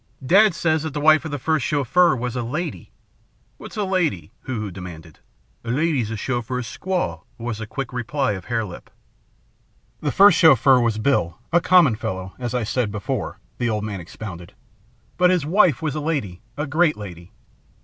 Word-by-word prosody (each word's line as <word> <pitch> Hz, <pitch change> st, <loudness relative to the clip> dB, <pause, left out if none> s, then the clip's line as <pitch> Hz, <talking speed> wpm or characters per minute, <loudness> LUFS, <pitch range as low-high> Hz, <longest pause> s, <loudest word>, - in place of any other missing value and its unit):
"Dad 200 Hz, +5 st, +5 dB
says 160 Hz, -2 st, +1 dB
that 155 Hz, -1 st, -5 dB
the -, -, -1 dB
wife 155 Hz, +2 st, +5 dB
of -, -, -3 dB
the 145 Hz, -, -3 dB
first 155 Hz, +1 st, 0 dB
Chauffeur 150 Hz, +4 st, +3 dB
was 125 Hz, -1 st, -4 dB
a 125 Hz, -, -1 dB
lady 150 Hz, +10 st, -4 dB, 0.4 s
" -, -, -40 dB
"What's -, -, -10 dB
a 210 Hz, -, 0 dB
lady?" 170 Hz, -, -1 dB
Hoo 130 Hz, -4 st, -3 dB
Hoo 105 Hz, -2 st, -4 dB
demanded. 85 Hz, -4 st, -10 dB, 0.4 s
"A 115 Hz, -, -7 dB
lady 145 Hz, +1 st, +1 dB
's 110 Hz, -, -5 dB
a 115 Hz, -, -4 dB
Chauffeur 125 Hz, +2 st, -2 dB
squaw," 180 Hz, +10 st, -3 dB, 0.2 s
was 115 Hz, -2 st, -4 dB
the 110 Hz, -, -6 dB
quick 135 Hz, +2 st, -5 dB
reply 130 Hz, +1 st, -1 dB
of 95 Hz, -3 st, -6 dB
Hare 115 Hz, -2 st, -1 dB
Lip. 90 Hz, -, -10 dB, 1.1 s
"The -, -, -1 dB
first 195 Hz, -3 st, +6 dB
Chauffeur 135 Hz, -4 st, +6 dB
was 115 Hz, -3 st, +1 dB
Bill, 105 Hz, -, 0 dB, 0.2 s
a 175 Hz, -, +5 dB
common 170 Hz, -11 st, +5 dB
fellow, 95 Hz, -2 st, -5 dB
as 120 Hz, -1 st, -3 dB
I 125 Hz, -, 0 dB
said 110 Hz, 0 st, -1 dB
before," 105 Hz, -2 st, -4 dB, 0.2 s
the 120 Hz, -, 0 dB
old 105 Hz, -2 st, -1 dB
man 105 Hz, -3 st, -4 dB
expounded; 90 Hz, +1 st, -9 dB, 0.6 s
"but 180 Hz, 0 st, +5 dB
his 180 Hz, -5 st, +1 dB
wife 165 Hz, -3 st, +3 dB
was 155 Hz, -3 st, -1 dB
a 150 Hz, -, -3 dB
lady, 140 Hz, -, -3 dB, 0.2 s
a 150 Hz, -, -1 dB
great 155 Hz, +2 st, +2 dB
lady. 90 Hz, -3 st, -9 dB
125 Hz, 190 wpm, -22 LUFS, 105-160 Hz, 1.1 s, first